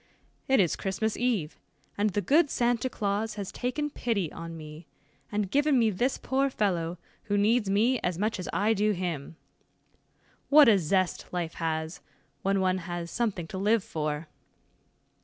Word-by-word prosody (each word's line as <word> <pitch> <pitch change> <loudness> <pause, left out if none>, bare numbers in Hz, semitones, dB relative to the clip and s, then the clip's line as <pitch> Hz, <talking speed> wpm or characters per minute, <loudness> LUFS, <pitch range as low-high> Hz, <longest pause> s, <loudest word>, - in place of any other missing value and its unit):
"It 265 - +4
is 180 -5 +3
Christmas 200 +3 -2
eve, 225 -11 -1 0.4
and 210 +1 +1
the 205 +1 -1
good 295 +6 +4
Santa 245 0 +1
Claus 210 0 -2
has 200 -3 -5
taken 290 +4 -2
pity 200 - -1
on 165 0 -7
me, 155 +1 -10 0.4
and 205 -2 -1
given 285 +1 +3
me 225 -3 +3
this 245 +8 0
poor 270 +1 0
fellow, 180 -8 -1 0.3
who 205 -2 0
needs 210 +1 +2
me 225 +6 +3
as 180 -2 -2
much 215 +2 -1
as 180 - -5
I 210 +3 +2
do 210 0 +2
him. 170 -5 -4 1.1
What 295 -1 +8
a 210 -4 +6
zest 185 +2 0
life 175 -2 -3
has, 160 0 -3 0.4
when 195 0 +1
one 185 0 +1
has 175 -1 -5
something 215 -8 -1
to 190 - -5
live 210 +1 +2
for." 155 0 -3
200 Hz, 160 wpm, -28 LUFS, 175-230 Hz, 1.1 s, What